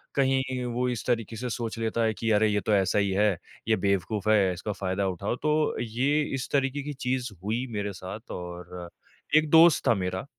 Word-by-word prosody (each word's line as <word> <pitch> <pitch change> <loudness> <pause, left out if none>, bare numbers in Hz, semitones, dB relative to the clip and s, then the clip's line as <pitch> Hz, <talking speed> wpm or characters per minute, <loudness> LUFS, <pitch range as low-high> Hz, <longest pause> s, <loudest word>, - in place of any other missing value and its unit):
कहीं 130 -2 +1
वो 125 +1 0
इस 120 -3 -4
तरीके 115 -2 -1
से 125 +3 -4
सोच 115 -1 -4
लेता 115 +1 0
है 110 -1 +2
कि 115 +1 -3
अरे, 110 +1 +4
ये 105 0 +1
तो 110 - 0
ऐसा 95 0 +2
ही 100 -1 +1
है, 100 -1 +2 0.3
ये 110 - +4
बेवकूफ़ 100 +2 0
है, 100 -4 +4
इसका 90 +4 -4
फ़ायदा 95 0 -2
उठाओ। 95 +5 -2
तो 150 +3 +1
ये 130 +6 +1 0.2
इस 125 - -5
तरीके 140 0 +1
की 145 +1 -5
चीज़ 130 -2 -2
हुई 115 +5 -1
मेरे 100 0 -2
साथ। 95 +4 -8
और 90 0 -7 0.5
एक 155 0 +3
दोस्त 165 -2 +6
था 120 - +6
मेरा, 95 +1 -3
110 Hz, 200 wpm, -27 LUFS, 100-125 Hz, 0.5 s, दोस्त